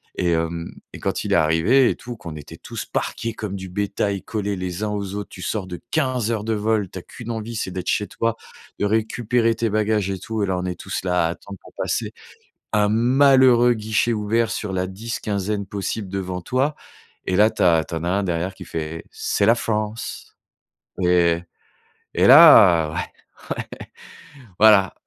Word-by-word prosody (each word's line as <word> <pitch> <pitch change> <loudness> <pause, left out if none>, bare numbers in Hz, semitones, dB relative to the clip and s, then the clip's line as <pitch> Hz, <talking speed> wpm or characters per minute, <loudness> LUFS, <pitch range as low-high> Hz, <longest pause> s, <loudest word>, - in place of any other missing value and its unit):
Et 90 - 0
hem 85 0 -2 0.2
et - - -8
quand - - -2
il - - 0
est - - +5
arrivé 80 +12 +4
et - - -1
tout, 120 0 -8
qu'on 85 -8 -9
était 75 - -10
tous - - -7
parqués 115 -1 -3
comme 105 -3 -5
du 95 0 -7
bétail, 100 +1 -2
collés 105 -2 -3
les 90 +2 -4
uns 105 - -1
aux 100 -2 -4
autres, 105 0 -5
tu 90 - -11
sors 95 0 -3
de 90 -1 -7
15 130 -7 0
heures 110 -2 -2
de 115 - 0
vol, 105 -2 0
tu 95 - -7
as - - -10
qu'une 120 +5 -11
envie, 115 +1 -5
c'est 95 - -3
d'être 90 0 -6
chez 105 - 0
toi, 115 +3 -2 0.4
de - - +1
récupérer 115 +2 +1
tes 115 0 -1
bagages 105 -2 0
et 95 -1 -3
tout 110 +1 -3
et - - +2
là, 95 -1 -1
on 90 - -3
est 90 -1 -4
tous - - -4
là 90 -2 +1
à - - -2
attendre 100 +2 -10
pour - - -16
passer - - -2 0.6
un 105 -1 +3
malheureux 125 +1 +5
guichet 110 +1 0
ouvert 110 +2 0
sur 105 -3 -4
la 95 0 -1
10, 110 +5 -5
quinzaine 100 0 -2
possible 100 0 -4
devant 95 -1 -4
toi. 130 - 0 0.5
Et 95 - 0
là, 105 +3 +5
tu - - -2
as 85 -3 +4
tu 85 - -6
en 80 - -4
as 85 - -1
un 100 +2 +1
derrière 90 +1 -2
qui 90 - -10
fait: 80 0 -5
«C'est 100 - 0
la 115 - +6
France» 110 -1 -4 0.7
et 85 -1 +3 0.7
et 90 - +2
là 105 - +8
ouais, - - -4
ouais, - - -6 1.4
voilà. 105 -3 +6
105 Hz, 200 wpm, -22 LUFS, 90-115 Hz, 1.4 s, là